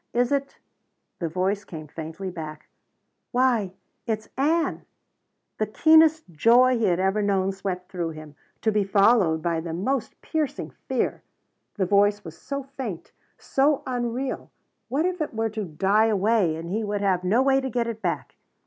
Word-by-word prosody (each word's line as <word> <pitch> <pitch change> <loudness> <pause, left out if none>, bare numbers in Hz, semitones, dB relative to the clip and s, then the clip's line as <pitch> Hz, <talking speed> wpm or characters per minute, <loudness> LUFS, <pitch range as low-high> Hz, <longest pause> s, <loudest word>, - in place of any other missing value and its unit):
"Is 245 +1 +2
it 275 -1 -1 0.3
?" - - -52
The 170 - -2
voice 190 +5 -1
came 155 -2 -8
faintly 160 +5 -6
back, 155 -3 -8 0.6
"Why 245 -6 +2 0.4
it's 220 -1 -2
Ann." 320 +5 0 0.7
The 215 - +1
keenest 315 +6 +5
joy 240 +10 +5
he 225 - +2
had 180 -2 +2
ever 190 +3 +1
known 195 -1 +1
swept 185 -2 -5
through 175 -3 -2
him. 155 -2 -10 0.3
To 220 - +2
be 210 -1 +2
followed 195 -5 +3
by 170 -1 0
the 165 0 -5
most 225 +6 -2
piercing 310 -3 -2 0.2
fear. - - -1 0.5
The 195 - 0
voice 205 +2 +3
was 165 -1 -8
so 280 -1 -5
faint 260 -10 -7 0.3
so 280 +1 +1
unreal 250 +1 -3 0.4
what 295 +6 +1
if 360 -2 -1
it 295 - -3
were 225 0 0
to 215 -1 -3
die 195 +7 +2
away 210 -5 +2
and 165 +2 -6
he 220 +3 -1
would 205 -1 -2
have 185 -3 +1
no 220 +8 +3
way 270 0 +3
to 265 - -3
get 240 -1 0
it 230 -2 -5
back! - - -3
210 Hz, 170 wpm, -25 LUFS, 180-255 Hz, 0.7 s, keenest